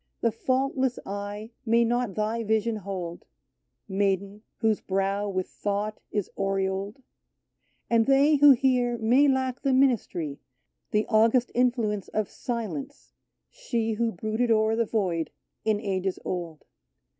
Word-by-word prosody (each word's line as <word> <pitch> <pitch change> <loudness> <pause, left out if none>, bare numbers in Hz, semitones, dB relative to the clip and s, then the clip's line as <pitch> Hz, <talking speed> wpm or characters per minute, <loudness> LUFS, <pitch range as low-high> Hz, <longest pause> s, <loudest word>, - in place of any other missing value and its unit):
The 230 - +2
faultless 260 +2 0
eye 205 +2 -5
may 235 0 +3
not 240 -3 0
thy 220 +2 -1
vision 220 +1 +1
hold 180 -4 -6 0.4
— - - -54 0.2
Maiden, 200 +1 -1 0.2
whose 220 -2 +1
brow 195 +1 -1
with 185 -1 -2
thought 205 +1 -3
is 205 -3 -1
aureoled 195 +4 -2 0.4
— - - -46
And 230 -1 +4
they 280 +2 +5
who 290 +1 +8
hear 250 -2 +3
may 245 +6 +4
lack 260 -1 0
the 275 -2 +1
ministry. 210 - +1 0.5
The 210 0 +1
august 230 +2 +3
influence 235 -5 +1
of 215 -2 -2
Silence, 220 - -5 0.4
she 235 - -2
Who 230 +1 0
brooded 220 +5 -1
o'er 220 0 +3
the 230 0 +1
void 180 -8 -1 0.4
in 215 -2 +2
ages 190 -2 -2
old. 170 -4 -5
220 Hz, 135 wpm, -27 LUFS, 195-240 Hz, 0.5 s, who